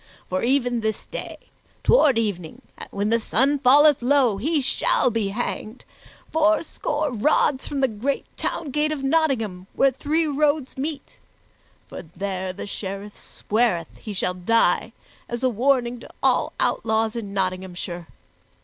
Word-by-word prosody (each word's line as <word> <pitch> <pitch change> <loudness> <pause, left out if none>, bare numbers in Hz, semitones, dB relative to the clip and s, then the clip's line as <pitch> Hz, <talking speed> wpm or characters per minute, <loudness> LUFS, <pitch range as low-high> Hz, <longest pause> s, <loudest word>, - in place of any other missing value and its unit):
For 185 - 0
even 245 -1 +1
this 220 -1 -2
day, - - -7 0.5
toward 300 - +5
evening, 195 -8 -3 0.3
when 205 +2 -2
the 230 - +3
sun 270 +6 +1
falleth 285 +2 +6
low, 250 -4 +3
he 300 +9 0
shall 450 - +1
be 225 -3 0
hanged, 215 +2 -4 0.5
fourscore 315 -2 +1
rods 265 +3 +2
from 280 -2 -2
the 265 - +4
great 250 +5 -2
town 305 -5 -3
gate 300 +2 +1
of 290 -3 -4
Nottingham, 255 - 0
where 275 - +4
three 305 +5 0
roads 295 -1 0
meet; 280 +1 -5 0.7
for - - -8
there 185 +2 -4
the 185 - -7
Sheriff 200 0 -6
sweareth 205 -7 -1
he 215 - -7
shall 185 -2 -1
die 185 +6 +2 0.4
as 240 +1 -4
a 255 - +4
warning 245 0 +1
to - - -12
all - - +2
outlaws 220 0 +1
in 215 -4 -5
Nottinghamshire. 185 -2 -3
240 Hz, 140 wpm, -23 LUFS, 200-285 Hz, 0.7 s, falleth